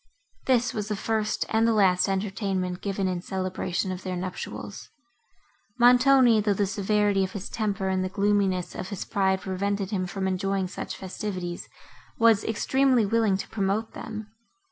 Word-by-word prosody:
This 250 -2 +2
was 210 -1 -3
the 210 - -1
first 215 +1 -1
and 225 +1 +3
the 230 - +3
last 190 -2 +3
entertainment, 190 -2 -2
given 195 -1 -1
in 180 -1 -2
celebration 185 0 -2
of 185 0 -5
their 185 -1 -4
nuptials. 180 +1 -6 0.9
Montoni, 250 -1 +6
though 205 -1 +1
the 205 - +1
severity 200 0 +1
of 190 - -4
his 200 -1 -6
temper 205 -3 -1
and 190 0 0
the 185 - -2
gloominess 195 -3 +1
of 185 - -6
his 200 -3 -5
pride 190 -1 +1
prevented 200 +1 -2
him 185 -3 -1
from 190 +1 -3
enjoying 190 0 -1
such 185 - -6
festivities, 185 -2 -5 0.5
was 225 -3 +4
extremely 255 +2 +2
willing 215 -2 +2
to - - -6
promote 210 +1 -1
them. 215 -1 -7
200 Hz, 160 wpm, -26 LUFS, 190-215 Hz, 0.9 s, Montoni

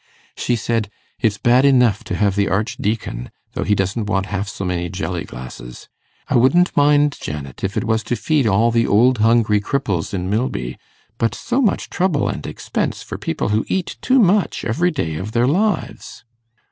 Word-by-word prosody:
She 120 - 0
said, 115 -2 -1 0.3
"It's 105 -3 +1
bad 125 +4 +4
enough 125 -7 +4
to - - -3
have 100 -2 +1
the 100 -1 +1
Archdeacon, 100 - -2 0.2
though - - -2
he 105 - +2
doesn't 100 +3 -1
want 95 -1 0
half 100 +1 -2
so 95 - -5
many 90 -1 -2
jelly 95 -3 -4
glasses. - - -10 0.4
I - - +2
wouldn't 170 +9 +3
mind, 145 0 +3
Janet, 70 -3 -6
if 100 +1 -2
it - - 0
was 110 -1 +1
to 120 - -1
feed 140 +2 +1
all 110 +4 +3
the 115 0 +2
old 120 +3 +4
hungry 110 -2 +3
cripples 105 -8 -2
in 90 -2 -3
Milby; 95 - -2 0.4
but 115 0 0
so 250 +3 -1
much 220 - 0
trouble 180 -6 +1
and - - -4
expense - - -3
for - - -7
people - - -2
who 105 +1 +1
eat 190 -2 -2
too 260 - +3
much 205 -4 +2
every 170 +10 +1
day 80 - -3
of 105 +6 -6
their 120 +1 +3
lives!" 185 +6 -1
110 Hz, 185 wpm, -20 LUFS, 95-140 Hz, 0.4 s, bad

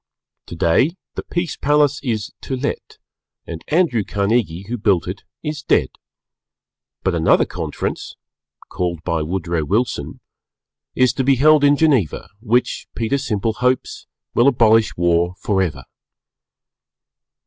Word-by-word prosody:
Today 130 - +1 0.2
the - - -4
Peace 175 -3 -3
Palace 145 -1 +2
is 110 -6 -3
to 135 - -4
let 140 +3 -4 0.5
and 80 -1 -7
Andrew 155 - +2
Carnegie, 100 -3 -1
who 120 +1 -4
built 100 -5 +1
it, - - -5 0.2
is 150 -1 -4
dead, - - +2 1.1
but 95 - +1
another 80 -1 +3
Conference - - -5 0.5
(called 85 -3 -3
by 85 -1 -1
Woodrow 85 0 -2
Wilson) 110 +10 -2 0.8
is 130 -1 +3
to 135 - -1
be 135 +1 +4
held 150 +3 +5
in 145 0 +5
Geneva 135 - +1
which, 120 +2 0
Peter 120 +4 0
Simple 110 -5 -1
hopes, 125 +3 -1 0.3
will 120 - +4
abolish 115 -4 +3
War 85 +1 +1
forever. 95 -10 -1
115 Hz, 125 wpm, -20 LUFS, 90-140 Hz, 1.1 s, held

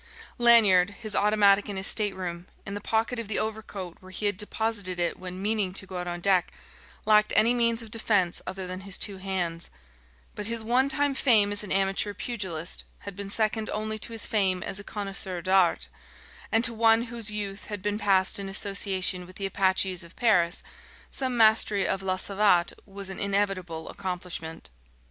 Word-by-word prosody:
Lanyard, 205 -6 +6
his 215 -3 -4
automatic 205 -1 +3
in 200 - -4
his 190 - -1
stateroom, 185 -5 0 0.2
in 200 - -5
the 205 - -5
pocket 225 +3 -1
of 230 - -4
the 215 - -1
overcoat 210 -5 -4
where 185 - -15
he 195 +3 -4
had 205 -1 +2
deposited 210 -2 -2
it 175 -1 -1
when 185 0 -6
meaning 205 -3 0
to 195 - -3
go 185 -1 -7
out 180 0 -4
on 175 0 -5
deck, 185 -1 +2 0.5
lacked 215 0 +4
any 230 +3 +5
means 235 -1 +2
of 220 - -12
defense 205 -6 0
other 190 0 -5
than 185 +1 -6
his 195 0 -4
two 200 -2 -2
hands; 180 -3 -2 0.6
but 210 - -5
his 230 -1 -2
one 250 +4 +2
time 285 -1 +1
fame 225 -7 +4
as 205 - -2
an 205 - -8
amateur 195 +1 +1
pugilist 185 -9 -4 0.2
had 200 -2 -8
been 200 0 -6
second 215 +1 0
only 215 0 -3
to 230 - -3
his 225 -2 -2
fame 190 -4 +1
as 190 - -3
a - - -8
connaisseur 195 -3 -2
d'art; 185 0 +3 0.6
and 225 +1 +3
to 235 - +1
one 225 0 +4
whose 230 -2 -3
youth 205 -1 -4
had 205 -3 -6
been 205 0 -1
passed 190 -2 +2
in 195 -1 -5
association 195 -2 +1
with 185 - -14
the 195 - -4
Apaches 190 -1 0
of 170 - -14
Paris, 180 -7 +2 0.5
some 260 -2 -1
mastery 215 -3 +4
of 195 - -1
la 185 -1 -1
savate 195 -3 +2
was 195 -1 -7
an 190 - -6
inevitable 195 -5 -1
accomplishment. 175 - -6
200 Hz, 185 wpm, -27 LUFS, 185-215 Hz, 0.6 s, Lanyard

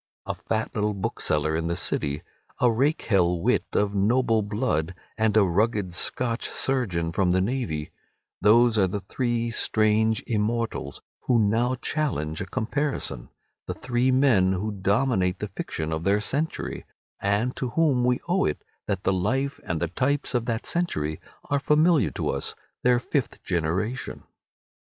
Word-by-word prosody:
A - - -2
fat 110 0 -2
little 105 -1 0
bookseller 80 -5 0
in 80 +1 -1
the 85 - -1
City, 75 -3 -1 0.4
a 125 -1 +4
rakehell 110 - +2
wit - - +1
of 100 0 +1
noble 115 +3 +2
blood, 95 -5 -1 0.2
and 110 -2 +2
a 105 - +7
rugged 100 0 +1
Scotch 115 +6 0
surgeon 95 -12 -1
from 90 +1 +2
the 95 - +3
navy—those 110 - 0
are 95 - +4
the 100 +2 -3
three 120 +2 -1
strange 110 -1 +2
immortals 110 -7 -2 0.2
who 125 - +4
now 115 +4 +2
challenge 125 - -2
a 95 - -4
comparison—the 120 - -4
three 125 +1 0
men 120 -9 +4
who 105 +4 -2
dominate 100 -1 +1
the 105 - -5
fiction 80 -4 -4
of 80 +1 -3
their 100 +3 +3
century, 145 +9 -2 0.4
and 105 +6 +1
to 130 - -2
whom 140 -3 +2
we 125 0 +2
owe 180 +3 +2
it 75 - -2 0.2
that 100 -2 -2
the 95 - +2
life 130 +10 0
and 80 -1 -2
the 85 - 0
types 130 - -1
of 120 -2 0
that 115 -1 -2
century 80 - -1 0.3
are 145 - +3
familiar 155 +1 +3
to - - -3
us, - - -2 0.3
their 125 -1 +4
fifth 130 +1 -2
generation. 95 +8 -2
110 Hz, 150 wpm, -25 LUFS, 95-125 Hz, 0.4 s, a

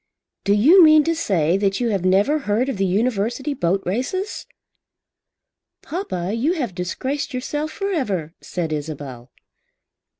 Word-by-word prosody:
"Do 200 - +3
you 310 - +7
mean 310 -1 +7
to 330 - +1
say 180 - +1
that 195 -1 0
you 240 -2 0
have 195 -4 -1
never 200 +11 +3
heard 235 +1 0
of 265 - -3
the 195 0 +1
University 230 +7 0
boat 190 -5 0
races?" 315 - -3 1.4
"Papa, 195 - -4
you 265 +10 +1
have 255 - -3
disgraced 260 +11 -3
yourself 295 +4 -3
for 395 +3 -3
ever," 190 - -2
said 165 -3 -3
Isabel. 145 -5 -6
215 Hz, 140 wpm, -21 LUFS, 180-290 Hz, 1.4 s, you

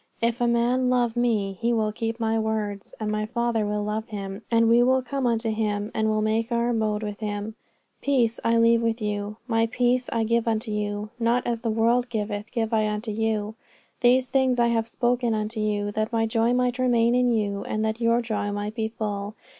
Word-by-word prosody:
If 235 +1 0
a 240 - +3
man 240 +2 +2
love 245 -2 +1
Me, 210 -6 0
he 235 +1 +2
will 215 -2 +1
keep 225 +1 -3
My 225 0 +1
words; 215 -2 -3
and 215 -1 -2
My 215 0 -1
Father 235 -2 0
will 210 0 -1
love 215 +1 -3
him, 200 -1 -6
and 230 -1 +4
We 235 +1 +5
will 260 +1 +3
come 260 +1 -2
unto 225 -1 0
him 210 -1 -1
and 220 0 +1
will 215 0 +1
make 220 +2 0
Our 235 0 +1
abode 215 -2 0
with 205 -1 -5
him. 210 0 -4 0.5
Peace 245 -5 +1
I 230 0 +3
leave 230 0 +4
with 230 0 0
you, 210 0 -3
My 225 -1 +2
peace 245 +2 +1
I 230 -1 +1
give 230 +1 +1
unto 220 0 -1
you: 210 0 -3
not 235 +1 +1
as 235 -1 -1
the 230 0 -2
world 235 +3 +2
giveth, 210 -1 -3
give 230 -2 -2
I 215 -1 +2
unto 210 +1 -3
you. 215 -1 -1 0.5
These 250 +1 +3
things 260 -2 +2
have 235 -1 +2
I - - -18
spoken 240 -1 0
unto 215 +1 -3
you 205 -1 -1
that 215 +2 -2
My 225 -1 +1
joy 225 +1 +1
might 250 0 +1
remain 240 -2 +3
in 250 0 +3
you, 205 -3 -1
and 215 0 -1
that 220 +2 -2
your 230 +1 +3
joy 215 -3 -2
might 205 +1 -3
be 220 -1 -1
full. 210 -2 -4
225 Hz, 215 wpm, -25 LUFS, 215-235 Hz, 0.5 s, We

